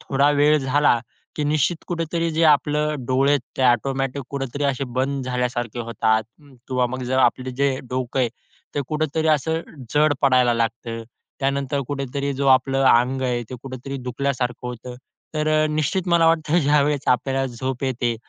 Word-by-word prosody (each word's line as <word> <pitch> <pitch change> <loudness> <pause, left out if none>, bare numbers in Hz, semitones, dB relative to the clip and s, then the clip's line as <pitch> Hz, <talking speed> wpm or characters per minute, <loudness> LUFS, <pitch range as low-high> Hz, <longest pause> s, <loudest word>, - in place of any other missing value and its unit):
थोडा 140 +1 +2
वेळ 150 +1 +5
झाला 135 -2 +3 0.4
की 150 - -1
निश्चित 155 +3 +1
कुठेतरी 165 -1 -2
जे 160 +1 0
आपलं 150 -2 +2
डोळे 135 +2 +2
आहेत, 145 -2 +3 0.2
ते 130 - 0
ऑटोमॅटिक 135 +3 +1
कुठेतरी 140 +1 -3
असे 140 0 0
बंद 135 +1 -1
झाल्यासारखे 125 -2 -2
होतात, 110 -1 +1 0.2
किंवा 130 -2 -3
मग 130 +1 -5
जर 130 +1 0
आपलं 130 0 +2
जे 135 -1 +1
डोकं 130 0 -2
आहे, 120 - +2 0.5
ते 145 - 0
कुठेतरी 155 +1 0
असं 160 +2 +1 0.3
जड 150 0 +4
पडायला 125 -3 +4
लागतं. 115 0 -2 0.4
त्यानंतर 140 +1 0
कुठेतरी 140 0 -3
जो 140 +1 -1
आपलं 135 +1 +1
अंग 130 +3 +2
आहे, 125 -2 0
ते 130 - -5
कुठेतरी 135 +1 -6
दुखल्यासारखं 125 -1 -2
होतं. 125 +1 -7 0.4
तर 155 0 0 0.2
अ, - - +2
निश्चित 155 +5 -1
मला 170 -1 +4
वाटतं, 165 0 +2
ज्यावेळेस 145 -1 +2
आपल्याला 135 +1 +1
झोप 130 +2 -3
येते, 120 -2 -1
135 Hz, 160 wpm, -22 LUFS, 125-145 Hz, 0.5 s, वेळ